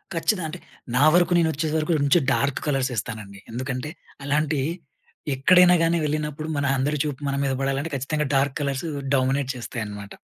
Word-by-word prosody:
ఖచ్చిద 185 +5 +1
అంటే, 155 - -7 0.4
నా 135 - +4
వరకు 175 0 +4
నేను 165 -1 +3
వచ్చే 155 +3 -2
సరకు 160 +2 +1
మంచి 145 +5 +4
డార్క్ 140 -1 0
కలర్స్ 135 -2 0
ఏస్తానండి. 105 -3 -5
ఎందుకంటే, 130 +4 -4 0.4
అలాంటి 150 +1 +1 0.8
ఎక్కడైనాగాని 170 +3 +5
వెళ్ళినప్పుడు, 150 +1 -3
మన 140 - 0
అందరి 145 +2 0
చూపు 150 -2 -4
మన 140 - -1
మీద 135 - 0
పడాలంటే, 135 +4 -1
ఖచ్చితంగా 150 +3 -1
డార్క్ 135 0 +1
కలర్స్ 140 +1 -2 0.3
డామినేట్ 135 +1 +1
చేస్తాయి 120 -1 -5
అన్నమాట. 105 -1 -8
140 Hz, 160 wpm, -24 LUFS, 130-155 Hz, 0.8 s, ఎక్కడైనాగాని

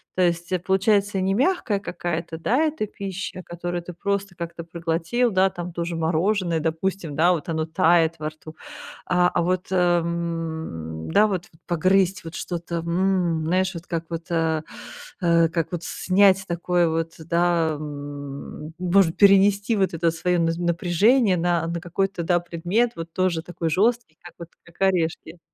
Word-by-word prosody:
То 185 - +1
есть, 175 0 0
э, 185 - +1
получается, 195 +2 +2
не 190 +1 +1
мягкая 250 - +1
какая-то, 170 -3 -4
да, 240 - +1
эта 315 -7 0
пища, 195 -2 -6
которую 175 0 -4
ты 180 - -8
просто 200 +1 -2
как-то 170 0 -6
проглотил, 170 +8 -1
да, 190 0 +3
там 175 -1 -7
то 170 0 -3
же 170 0 -4
мороженое, 170 +2 +1
допустим, 165 0 -2
да, 170 +4 +4
вот 165 -1 -4
оно 160 -1 -1
тает 165 0 +3
во 155 0 -2
рту, 155 0 -13 0.5
а, 180 0 +3
а 175 - 0
вот, 180 +1 -1
м, 165 - -1
да, 210 - +5
вот, 185 -4 -3 0.2
погрызть 190 +3 +2
вот 165 - -7
что-то, 170 -1 -4
м, 170 -1 0
знаешь, 185 +2 +1
вот 170 +1 -8
как 165 -1 -3
вот, 165 -1 -5
э, 160 -1 +1 0.6
э, 170 -2 +4
как 165 -1 -2
вот 175 -2 -4
снять 190 +1 +3
такое 175 0 +1
вот, 165 0 -2
да, 170 0 +1
м, 145 0 -7
может 180 -2 +3
перенести 200 +2 +5
вот 190 -4 +1
это 165 0 +1
своё 175 +2 0
наз 165 0 +1
напряжение 180 +6 +2
на, 170 -1 +1
на 170 0 -3
какой-то, 195 +1 -2
да, 175 +1 +2
предмет, 175 +8 0
вот 165 0 -7
тоже 185 -3 0
такой 170 -1 -3
жёсткий, 220 -2 +1
как 175 - -13
вот, 170 -1 -9
как 175 - -20
орешки. 170 -3 0
175 Hz, 165 wpm, -23 LUFS, 165-190 Hz, 0.6 s, да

